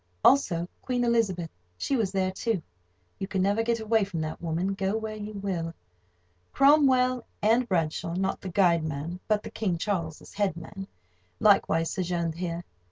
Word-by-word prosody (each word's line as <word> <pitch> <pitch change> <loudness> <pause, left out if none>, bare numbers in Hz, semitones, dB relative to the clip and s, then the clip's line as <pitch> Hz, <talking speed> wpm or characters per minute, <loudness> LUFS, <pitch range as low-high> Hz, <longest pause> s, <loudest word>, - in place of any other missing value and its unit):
Also 175 -11 +4
Queen 250 -1 -1
Elizabeth, 205 -8 +1 0.3
she 275 - 0
was 215 -6 0
there, 190 -1 0
too. 195 -1 -1 0.6
You 195 - -3
can 190 -2 0
never 200 +3 +2
get 230 0 0
away 220 0 +2
from 195 -4 -4
that 155 0 -4
woman, 170 +3 -1
go 195 +2 -1
where 220 -1 -4
you 210 0 -6
will. 180 -5 -3 0.8
Cromwell 260 -3 +5 0.2
and 235 +3 +3
Bradshaw 165 -1 0
(not 190 +1 -1
the 190 - -5
guide 175 -3 +3
man, 160 +3 -4
but 210 -1 +1
the - - -7
King 190 -6 -1
Charles's 165 -4 -3
head 195 -5 0
man) 195 +4 -8 0.5
likewise 165 -5 +4
sojourned 170 -2 -1
here. 170 0 -4
195 Hz, 165 wpm, -27 LUFS, 170-220 Hz, 0.8 s, Cromwell